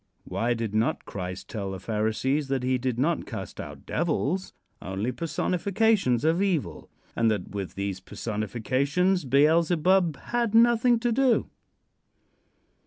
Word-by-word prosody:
Why 120 +1 -1
did 115 -2 -3
not 110 +2 0
Christ 90 -1 -6
tell 100 -3 -4
the 95 - -6
Pharisees 110 - -1
that 135 -2 -1
he 130 0 +1
did 125 -1 -2
not 155 +6 0
cast - - -7
out - - -10
devils 170 +2 -1 0.3
only 95 +6 -3
personifications 180 - +1
of 165 +4 +2
evil; 185 -7 -1 0.3
and 115 -1 +3
that 105 -2 -2
with 100 -3 -5
these 100 -1 -3
personifications 130 - -1
Beelzebub 165 +5 +3
had 235 -2 -1
nothing 235 +1 +5
to 240 0 +1
do? 255 0 +2
140 Hz, 130 wpm, -26 LUFS, 110-185 Hz, 0.3 s, nothing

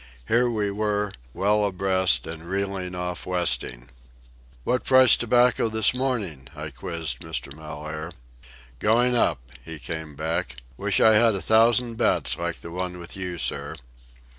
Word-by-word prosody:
Here 120 +2 +3
we 105 -3 -1
were, 105 0 -1 0.2
well 105 +7 +1
abreast 95 -9 +2
and 80 +1 -8
reeling 95 -2 -3
off 90 -1 -4
westing. 65 -9 -1 0.7
"What 125 - 0
price 130 -3 +7
tobacco 120 0 +2
this 110 0 +2
morning?" 110 - -3
I 75 0 -5
quizzed 75 0 -4
Mr. 80 -4 -5
Mellaire. 75 +1 -7 0.7
"Going 120 - +3
up," - - 0
he 80 -1 -7
came 75 +2 -6
back. 80 -4 -3 0.2
"Wish - - 0
I 110 - +6
had 110 0 +4
a - - -2
thousand 115 +3 +3
bets 70 - +1
like 85 -1 -4
the 85 - -9
one 90 0 -4
with 85 -1 -9
you, 90 -2 -5
sir." - - -2
90 Hz, 145 wpm, -24 LUFS, 80-110 Hz, 0.7 s, price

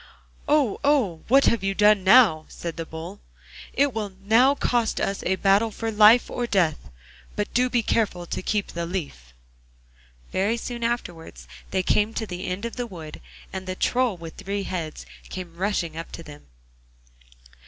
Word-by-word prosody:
'Oh! 290 -8 +2
oh! 245 - +2
What 275 +4 +5
have 230 -4 +2
you 195 0 0
done 210 -1 +4
now?' 190 -7 +6
said 170 -1 -6
the 165 -1 -6
Bull. 170 +5 -8 0.5
'It 280 -1 +2
will 210 -3 -4
now 245 +7 +4
cost 240 -5 0
us 195 - -1
a 190 - +2
battle 200 +4 +3
for 225 +1 -4
life 215 +3 +6
or 240 -1 -3
death; 175 -8 0 0.5
but 210 - -3
do 250 +1 +2
be 240 -2 +1
careful 195 -6 0
to - - -4
keep 205 +1 -1
the 170 0 -4
leaf.' 145 - -6 1.0
Very 205 +5 0
soon 235 0 -5
afterwards 205 -9 -4 0.2
they 185 - 0
came 210 +4 +1
to 225 - -2
the 180 -3 -6
end 185 +5 -3
of 235 - -6
the 245 -1 -3
wood, 160 -7 -10 0.3
and 190 0 -6
the 185 - -3
Troll 245 -1 +1
with 165 -1 -10
three 200 0 -3
heads 170 -5 -5 0.2
came 180 -3 -7
rushing 175 -3 -2
up 165 +1 -7
to 165 - -8
them. 150 -1 -13
200 Hz, 175 wpm, -24 LUFS, 175-230 Hz, 1.0 s, now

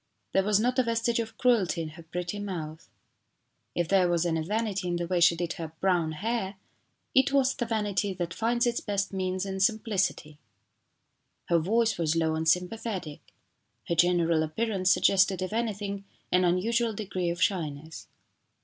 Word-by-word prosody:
There 195 - +4
was 210 0 +3
not 250 +3 +1
a - - +5
vestige 230 0 0
of 225 -1 -4
cruelty 220 -8 +2
in 155 - -5
her 160 +2 -12
pretty 175 +4 -5
mouth. 165 -6 -6 0.9
If 175 -1 0
there 185 -1 +3
was 175 0 +1
any 165 -2 0
vanity 200 +1 -2
in 175 - -1
the 175 0 -2
way 180 +1 0
she 170 0 +5
did 170 0 -3
her 160 -1 -7
brown 175 -4 +1
hair 205 +3 -2 0.6
it 265 +1 +4
was 270 -1 +3
the 240 - -3
vanity 205 -3 0
that 175 -1 -3
finds 235 +2 +1
its 240 -1 0
best 200 -1 -2
means 185 0 -2
in 190 -1 -4
simplicity. 195 -8 0 1.1
Her 170 -1 +4
voice 225 +5 +1
was 160 -1 +1
low 160 -1 +1
and 160 0 0
sympathetic. 180 -2 -2 0.7
Her - - +2
general 170 -1 +3
appearance 190 +4 0
suggested, 190 0 +4
if 185 - -4
anything, 205 -3 -3 0.3
an 180 0 +4
unusual 225 +6 +1
degree 185 -4 -2
of 170 +1 -3
shyness. 160 -5 -2
190 Hz, 165 wpm, -28 LUFS, 170-220 Hz, 1.1 s, a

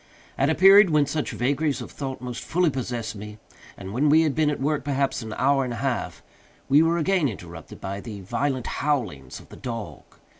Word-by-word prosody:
At 135 - +1
a 160 - +2
period 195 +2 +8
when 150 -2 +3
such 150 +1 -2
vagaries 140 +4 0
of - - -8
thought 135 -3 -6
most 125 -1 -6
fully 175 -1 +1
possessed 120 -4 -4
me, 105 +1 -9 0.4
and 95 0 -8
when 145 +6 +2
we 160 +2 +6
had 155 -3 +1
been 155 0 +2
at 150 - -2
work 145 +2 0
perhaps 140 -2 -1
an 110 -1 -6
hour 135 +1 +3
and 125 -2 -3
a 115 - -5
half, 125 -5 -3 0.4
we 145 +3 +5
were 165 +1 +2
again 170 -3 +2
interrupted 85 -6 -10
by 100 +1 -5
the 105 -3 -8
violent 130 +6 -2
howlings 110 - -2
of - - -17
the - - -12
dog. 115 -4 -6
135 Hz, 210 wpm, -24 LUFS, 115-150 Hz, 0.4 s, period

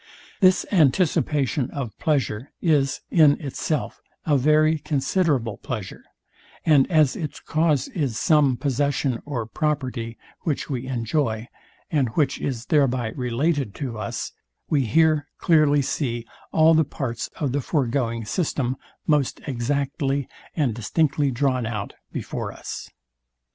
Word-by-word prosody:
This 185 -2 +5
anticipation 150 - +2
of 125 -8 -5
pleasure 130 -5 0
is, 145 -5 +2
in 155 -5 +5
itself, 145 +1 -3 0.2
a 150 - +3
very 155 +3 +4
considerable 140 - 0
pleasure; 100 -3 -6 0.6
and 150 -4 +5
as 155 -5 +4
its 150 -4 -5
cause 155 -4 +1
is 135 - -2
some 145 -2 +3
possession 140 -2 0
or 125 -6 -2
property, 125 -3 -2 0.2
which 150 -1 -2
we 130 -1 -3
enjoy, 115 -2 -1 0.4
and 140 -6 +2
which 145 -4 +1
is 125 -4 -3
thereby 130 -6 +2
related 130 0 -1
to 125 -6 -4
us, 105 - -4 0.4
we 140 -6 +2
here 155 +3 +3 0.2
dearly 150 -3 +5
see 120 -4 -2 0.3
all 160 0 +5
the 160 0 +5
parts 120 -5 -4
of 145 -4 -1
the 140 +2 0
foregoing 120 -5 -1
system 130 - -1 0.3
most 150 -4 +1
exactly 140 +1 -1 0.3
and 140 -8 +1
distinctly 140 +5 +1
drawn 130 -2 0
out 105 -3 -4 0.2
before - - -4
us. - - -7
140 Hz, 125 wpm, -24 LUFS, 120-150 Hz, 0.6 s, This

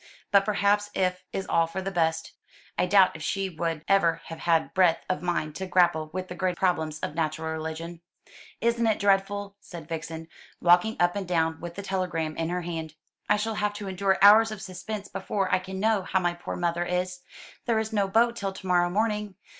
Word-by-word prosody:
But 200 -1 +5
perhaps 205 0 +2
if 185 -1 0
is 195 - -3
all 165 0 +2
for 170 +3 -5
the 190 +1 -3
best. 160 -3 0 0.4
I 180 - +1
doubt 190 -1 +5
if 160 - -8
she 195 +4 -1
would 165 -1 -3
ever 170 -4 +3
have 165 - -7
had 165 -2 +1
breadth 180 -3 +3
of 185 - -1
mind 170 -4 -2
to 190 - -4
grapple 175 -4 +2
with 185 0 -4
the - - -6
great 180 0 -1
problems 160 -4 0
of - - -3
natural 160 0 -2
religion." 160 +2 -5 0.6
"Isn't 235 0 +2
it 220 - +2
dreadful?" 200 0 0
said 170 -5 -10
Vixen, 160 0 -6 0.3
walking 180 +5 +4
up 175 +1 +3
and 200 -3 -3
down 160 -2 0
with 170 0 -7
the 200 - -6
telegram 175 -5 -2
in 165 0 -2
her 180 +1 -1
hand. 160 -2 -5 0.3
"I 210 - +4
shall 220 +2 -2
have 210 -1 -1
to 205 -1 -7
endure 190 0 +1
hours 215 +2 +8
of 215 -2 -6
suspense 200 +3 -6
before 195 -2 -2
I 185 - +4
can 190 +1 -7
know 215 0 +2
how 190 +1 0
my 175 -1 0
poor 175 - -6
mother 175 0 0
is. 180 +1 -2 0.5
There 230 -2 +2
is 220 0 -2
no 200 -2 +2
boat 235 +4 +3
till 195 -4 -3
to 190 - -11
morrow 175 -1 +3
morning. 210 0 -1
185 Hz, 210 wpm, -27 LUFS, 165-200 Hz, 0.6 s, hours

